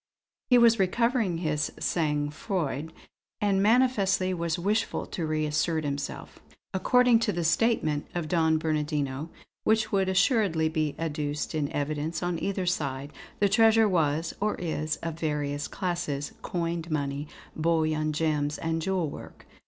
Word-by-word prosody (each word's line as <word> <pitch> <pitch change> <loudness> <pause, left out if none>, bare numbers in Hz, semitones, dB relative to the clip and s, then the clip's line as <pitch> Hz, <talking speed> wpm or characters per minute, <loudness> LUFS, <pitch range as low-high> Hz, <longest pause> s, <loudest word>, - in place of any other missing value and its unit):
He 250 - +7
was 230 -2 +5
recovering 220 0 +1
his 155 -3 -1
sang 150 -3 0
froid, 160 - -3 0.5
and 200 -2 +2
manifestly 200 -5 +3
was 170 -2 -1
wishful 210 +5 0
to 165 -3 -4
reassert 155 +1 0
himself. 140 -1 -5 0.3
"According 245 +5 +4
to 225 - +1
the 175 -3 -2
statement 160 -5 +1
of 170 -3 -2
Don 160 -1 +2
Bernardino, 150 -2 -2 0.3
which 220 0 +2
would 195 -2 +2
assuredly 190 - +2
be 155 -2 -1
adduced 150 -2 -3
in 150 -2 -1
evidence 155 +3 -2
on 175 -1 -2
either 195 -2 -1
side, 140 -5 -2 0.3
the 205 - +4
treasure 225 +2 +5
was, 160 -3 +1
or 210 +1 0
is, 155 -2 -2
of 165 -1 -4
various 145 -2 -2
classes; 175 -7 -3
coined 170 -1 -3
money, 145 -1 -2 0.3
bullion, 155 -1 +1
gems 150 -1 0
and 165 0 -2
jewel 185 -1 0
work. - - -10
165 Hz, 135 wpm, -27 LUFS, 150-195 Hz, 0.5 s, He